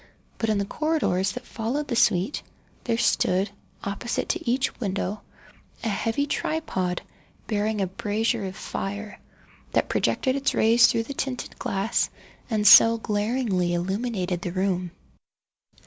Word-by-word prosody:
But 225 - 0
in 215 - +2
the 200 - 0
corridors 210 - 0
that 250 0 -7
followed 255 +7 -3
the 240 - -2
suite, 190 +3 +2 0.4
there 230 -2 +1
stood, 195 -3 +2 0.3
opposite 200 +4 -3
to - - -1
each 260 +3 0
window, 200 -1 -2 0.6
a 230 - 0
heavy 225 +7 0
tripod, 235 - -2 0.4
bearing 210 -1 0
a - - +2
brazier 210 +3 -1
of 190 0 -5
fire, 205 +3 -5 0.5
that - - +1
projected 260 -1 +1
its 275 0 0
rays 230 +2 +6
through 230 - +1
the 280 - -6
tinted 265 -2 -4
glass 200 +4 0 0.4
and 215 -3 0
so 230 +2 +9
glaringly 210 -4 0
illumined 195 +7 -2 0.3
the 175 - -3
room. 185 -1 0
215 Hz, 135 wpm, -25 LUFS, 195-240 Hz, 0.6 s, so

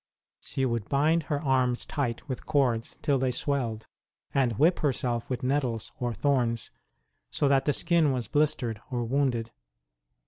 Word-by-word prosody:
She 135 - -2
would 115 -4 -2
bind 155 +4 +3
her 145 - +1
arms 130 -4 +1
tight 125 -4 -3
with 130 -3 -5
cords 130 -7 +1
till 140 -2 +2
they 130 0 +1
swelled, 120 -4 -2 0.5
and 125 -6 +1
whip 165 +5 +4
her 145 - +2
self 120 -2 -2
with 130 -1 -3
nettles 125 -4 -1
or 120 -1 -1
thorns, 120 -2 0 0.6
so 145 - +1
that 135 -1 +3
the 145 - +3
skin 165 -3 +3
was 125 -4 -2
blistered 125 -7 0
or 120 -3 -1
wounded. 120 -2 0
130 Hz, 160 wpm, -28 LUFS, 120-145 Hz, 0.6 s, whip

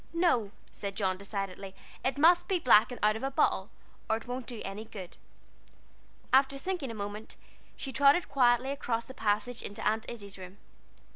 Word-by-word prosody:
"No," 335 - +2 0.2
said 200 -1 -5
John, 190 -2 0
decidedly, 195 -1 -5 0.3
"it 260 0 0
must 345 +4 +5
be 380 - +2
black 235 -7 +5
and 245 - -6
out 215 0 +4
of 220 - -5
a 270 - -1
bottle, 270 - +1 0.4
or 220 - +3
it 225 - -11
won't 245 0 -5
do 240 -3 -7
any 195 +2 -5
good." 200 -5 -9 1.2
After 270 +1 +4
thinking 350 -2 -3
a 230 - -6
moment, 205 +1 -6 0.4
she 265 - -6
trotted 285 +7 +5
quietly 250 -1 +3
across 235 -5 -2
the 260 - -10
passage 225 +1 -1
into 205 - -4
Aunt 220 +1 0
Izzie's 200 -4 -9
room. 185 +1 -10
230 Hz, 180 wpm, -30 LUFS, 205-270 Hz, 1.2 s, must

